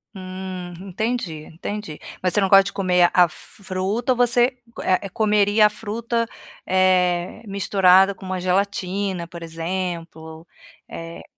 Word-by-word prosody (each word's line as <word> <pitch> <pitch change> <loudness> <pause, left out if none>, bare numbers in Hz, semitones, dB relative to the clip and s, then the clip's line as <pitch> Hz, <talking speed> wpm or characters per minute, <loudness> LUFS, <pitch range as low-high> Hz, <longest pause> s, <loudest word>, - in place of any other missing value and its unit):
Hum, 185 -1 -7 0.2
entendi, 210 -6 -3
entendi. 190 -1 -6 0.2
Mas 185 -1 0
você 210 - +3
não 195 - +2
gosta 195 0 +7
de 200 - -3
comer 180 -2 +3
a 180 - +7
f 200 +5 -10
fruta 195 +7 -1
ou - - +3
você, 245 +1 +3 0.3
eh, 185 +1 +1
comeria 210 +1 +3
a - - +5
fruta, 230 +2 -2 0.4
eh, 180 -1 +2
misturada 195 -1 +4
com 190 - -16
uma 185 -1 -3
gelatina, 190 -1 -1
por 170 -1 -10
exemplo? 165 -1 -5 0.4
Eh 165 0 -8
185 Hz, 135 wpm, -22 LUFS, 180-205 Hz, 0.4 s, gosta